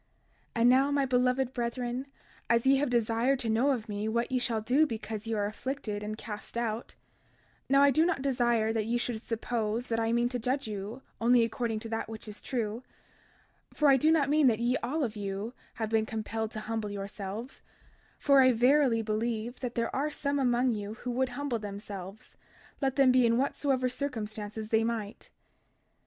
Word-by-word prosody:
32:24 230 - 0
And 240 - +6
now, 270 +2 +4
my 285 -1 +2
beloved 250 0 +1
brethren, 245 +2 -3 0.4
as 235 +1 +3
ye 270 +1 +5
have 290 0 +1
desired 235 +2 +2
to 235 -3 -2
know 235 +6 +3
of 240 -5 -1
me 205 0 -3
what 235 +3 -1
ye 255 - +2
shall 230 -2 0
do 265 +8 +3
because 220 -2 -5
ye 225 - -1
are 205 -1 0
afflicted 215 -1 -4
and 215 +1 -4
cast 215 +1 -7
out—now 235 +4 -3
I 280 - +6
do 310 +5 +4
not 335 -6 0
desire 240 -4 +2
that 220 -2 0
ye 235 +1 +1
should 240 -2 -3
suppose 230 0 -2
that 225 -1 0
I 225 0 +1
mean 240 +1 +2
to 250 0 -3
judge 255 +2 -1
you 210 +4 -6 0.2
only 240 +1 +5
according 230 -1 -2
to 225 - -6
that 225 0 -3
which 220 0 -8
is 210 - -8
true— 230 -3 -3 0.9
32:25 - - -23
For 300 -1 +5
I 270 - +7
do 310 +5 +3
not 295 -4 +3
mean 300 -2 +5
that 225 -3 +3
ye 240 +2 +1
all 290 +6 -2
of 230 -4 -2
you 200 +3 -4 0.2
have 220 -1 -3
been 220 -1 +2
compelled 220 0 -3
to 215 - -4
humble 220 -1 -3
yourselves; 200 +4 -6 0.6
for 280 -2 +5
I 255 -1 +6
verily 250 -1 +4
believe 225 +2 -2
that 245 -2 -4
there 230 -1 -1
are 285 +3 0
some 285 -1 -1
among 250 -1 +2
you 210 -1 -4
who 245 +2 -5
would 255 +1 0
humble 250 -2 -2
themselves, 200 -1 -8 0.5
let 270 -1 +1
them 270 -2 +5
be 255 0 +5
in 230 0 +3
whatsoever 265 -1 +1
circumstances 215 -5 -4
they 225 0 +3
might. 225 -3 -4
235 Hz, 195 wpm, -30 LUFS, 220-260 Hz, 0.9 s, I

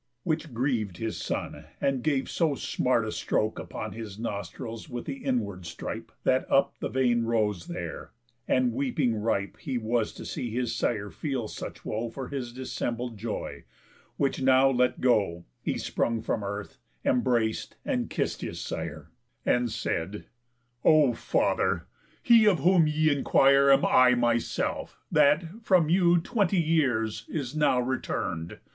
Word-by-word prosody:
Which 155 -2 -2
grieved 115 -7 -1
his 110 +1 -3
son, - - -4
and 135 -2 0
gave 140 -1 0
so 160 -4 +1
smart 125 -3 0
a 110 - -3
stroke 110 0 -1
Upon - - -6
his 110 -3 -7
nostrils 110 - -5
with 120 -2 -5
the 275 - -4
inward 100 - -2
stripe, 85 - -6
That - - +1
up - - +4
the - - -3
vein 120 -2 +2
rose 105 -6 0
there; - - -6 0.4
and 125 -2 +2
weeping 125 -2 0
ripe 105 -2 -1
He 135 -4 -3
was 115 -1 0
to - - -9
see 120 - -4
his 120 0 -2
sire 105 -3 -1
feel 135 -7 -3
such - - -8
woe 115 +2 -2
For 130 +3 -7
his 130 -4 -4
dissembled 120 -1 -4
joy; 110 0 -5 0.5
which 140 -1 0
now 130 +1 +5
let 125 -1 +1
go, 100 -9 +2 0.2
He - - -2
sprung 115 -1 -1
from 110 - -1
earth, 100 +1 -6 0.3
embrac'd 120 -3 +1
and - - -1
kiss'd - - -2
his - - -5
sire, - - -5 0.3
And 120 -2 +2
said: 95 +3 -3 0.6
"O 150 -5 +5
father! - - 0 0.4
He 230 -3 +6
of 180 -8 +4
whom 175 -1 +5
y' 155 +1 +2
enquire 140 0 +5
Am 135 - +5
I 125 -1 +6
myself, 120 -1 -1
that, 165 +9 +3
from 180 -7 +3
you 175 0 +5
twenty 200 0 +1
years, 130 -10 +1
Is 140 -3 -4
now 150 -4 +3
return'd. 105 -9 -3
125 Hz, 150 wpm, -28 LUFS, 110-145 Hz, 0.6 s, He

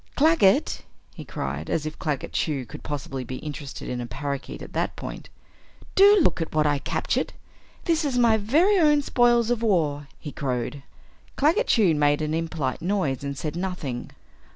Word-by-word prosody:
"Claggett!" 295 -10 +3 0.3
he - - -9
cried, 70 +4 -5
as 155 - -1
if 155 - -6
Claggett 150 -4 -3
Chew 140 -5 -1
could 150 +5 -10
possibly 135 -2 -5
be 130 - -6
interested 145 0 -7
in 125 -1 -3
a 120 - -5
parakeet 140 +4 -5
at - - -11
that - - -1
point, - - -8 0.6
"do 405 +1 +7
look 185 - +2
at 160 - -4
what 155 -1 +3
I 145 -1 +2
captured! - - -1 0.5
This 330 -2 +2
is 275 -4 -1
my 235 -2 +5
very 315 - +3
own 295 -3 +4
spoils 240 -2 +3
of 240 -2 0
war!" 155 -10 +1
he 150 - -8
crowed. 130 0 -3 0.5
Claggett 335 - +2
Chew 200 -8 +4
made 145 0 +2
an 155 0 -1
impolite 160 -5 -2
noise 170 -9 -1
and 140 -1 -4
said 150 +3 -4
nothing. 175 -9 -4
155 Hz, 175 wpm, -25 LUFS, -, 0.6 s, do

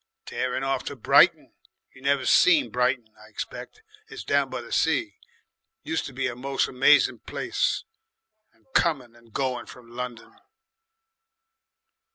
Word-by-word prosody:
"Tearin' 130 +1 -3
off 135 -1 -1
to 145 - -5
Brighton 125 - +4 0.4
you 130 - -17
never 140 -1 +1
seen 175 -4 +4
Brighton, 125 -3 0
I 110 - -16
expect 125 - -8 0.2
it's 440 -1 -9
down 140 -1 +1
by 130 -1 -5
the 120 - -13
sea, - - 0 0.6
used 160 - -2
to - - -9
be 135 +1 -3
a 125 -3 -2
moce 135 +2 -1
'mazing 135 +3 +4
place - - -2 0.7
and - - -33
coming 130 -8 +1
and 115 -1 -21
going 130 0 -2
from 120 -1 -14
London." 125 -2 -7
130 Hz, 140 wpm, -25 LUFS, 120-140 Hz, 0.7 s, Brighton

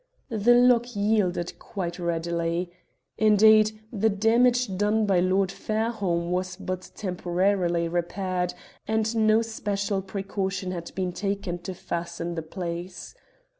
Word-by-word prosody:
The 230 +1 +4
lock 245 -1 +4
yielded 200 -4 0
quite 180 -4 -5
readily. 170 0 -1 0.5
Indeed, 215 0 +5
the 220 +1 +2
damage 230 +1 +3
done 210 +3 +2
by 195 -3 +3
Lord 185 +1 +2
Fairholme 205 -6 -1
was 185 +1 -1
but 185 -1 -5
temporarily 180 -2 0
repaired, 180 +1 -2 0.3
and 220 +1 0
no 220 0 +4
special 205 -3 -2
precaution 195 -1 -3
had 170 -2 -6
been 185 -1 -1
taken 195 -2 -3
to 185 +1 -6
fasten 170 0 -4
the 165 - -3
place. 175 +2 -6
195 Hz, 120 wpm, -26 LUFS, 175-215 Hz, 0.5 s, Indeed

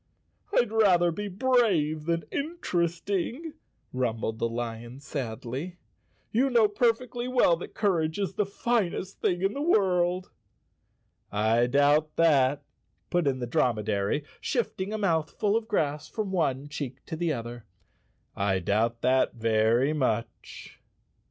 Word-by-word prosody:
" 415 - -34
I'd 240 -3 +3
rather 185 -6 +4
be 205 +5 -4
brave 190 - +1
than 170 0 0
interesting," 215 - -2 0.4
rumbled 115 -3 -2
the 115 - 0
lion 120 +1 -5
sadly. 135 +4 -5 0.3
' - - -41
You 260 +5 +2
know 235 -4 +5
perfectly 240 +3 0
well 250 -9 +4
that 175 - -9
courage 165 -6 +1
is 200 -2 -2
the 210 - 0
finest 200 -3 -1
thing 180 +1 0
in 195 +2 +1
the 280 - -4
world." 185 - +2 1.0
"I 110 +3 +2
doubt 145 +3 +3
that," 145 -4 +3 0.5
put 175 -4 +1
in 135 -2 +1
the 125 - -3
dromedary, 110 +1 0 0.2
shifting 210 -6 -2
a 215 - -2
mouthful 195 +2 0
of 225 -1 -1
grass 155 -7 -1
from 210 -3 -3
one 145 -6 0
cheek 140 -3 -6
to 165 - -5
the 170 0 -1
other, 120 -2 -7 0.7
"I 100 -1 +1
doubt 110 +6 0
that 130 0 +2
very 115 +4 +2
much." 115 -6 -3
160 Hz, 135 wpm, -27 LUFS, 125-205 Hz, 1.0 s, know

